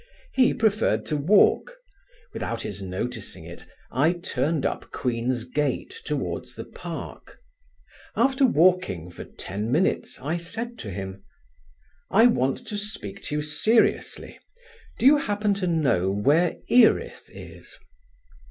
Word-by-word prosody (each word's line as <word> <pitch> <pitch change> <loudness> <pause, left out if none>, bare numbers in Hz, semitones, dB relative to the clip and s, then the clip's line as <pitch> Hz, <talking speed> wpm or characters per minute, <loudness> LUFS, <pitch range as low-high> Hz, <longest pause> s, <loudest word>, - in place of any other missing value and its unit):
He 260 -1 +4
preferred 215 -1 +1
to 155 - -2
walk: 200 - +3 0.6
without 115 0 -3
his 100 -1 -5
noticing 100 +4 -5
it - - -11 0.2
I 150 +7 +3
turned 155 -4 -1
up - - -3
Queen's 120 -1 -1
Gate 140 - -2
towards - - -3
the - - -6
park. - - -9 0.8
After 265 +4 +2
walking 175 - +3
for - - -8
ten 105 +5 -5
minutes 165 +8 0
I 145 +6 -2
said 225 +7 -5
to 105 - -6
him: 95 0 -6 0.9
"I 225 +4 +5
want 135 - +2
to 210 -2 -3
speak 200 - -6
to 150 - -3
you 150 - 0
seriously. 215 +10 +1 0.6
Do - - -2
you 290 +3 +8
happen 210 -5 0
to 195 -2 -2
know 130 - +2
where 145 - +2
Erith 240 -2 +3
is?" - - -11
155 Hz, 130 wpm, -25 LUFS, -, 0.9 s, you